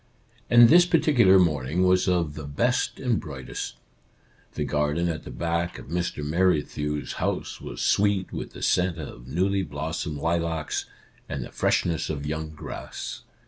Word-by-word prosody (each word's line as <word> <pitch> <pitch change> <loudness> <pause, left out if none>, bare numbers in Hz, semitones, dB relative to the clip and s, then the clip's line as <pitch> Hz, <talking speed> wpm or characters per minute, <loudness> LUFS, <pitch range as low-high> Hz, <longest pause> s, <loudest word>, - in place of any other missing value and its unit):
And 120 0 +8
this 175 +6 +7
particular 125 - +5
morning 80 -1 +2
was 90 0 +3
of 85 -5 +1
the 75 -1 -7
best 120 - 0
and 125 -5 +1
brightest. 70 -4 -6 0.8
The - - -1
garden 75 +3 0
at 80 -2 -3
the - - -7
back 85 +7 -2
of - - -11
Mr. 85 -3 -2
Merrithew's 75 -3 0
house - - -2
was - - -5
sweet 100 -2 +2
with - - -5
the - - -8
scent 90 -1 +2
of 65 -6 -8
newly 95 +7 +1
blossomed 80 -1 -4
lilacs, 80 0 -1 0.4
and 65 - -3
the - - -11
freshness 80 -2 0
of 75 -2 -3
young 80 +1 -3
grass. 75 -1 -7
85 Hz, 150 wpm, -26 LUFS, 75-95 Hz, 0.8 s, And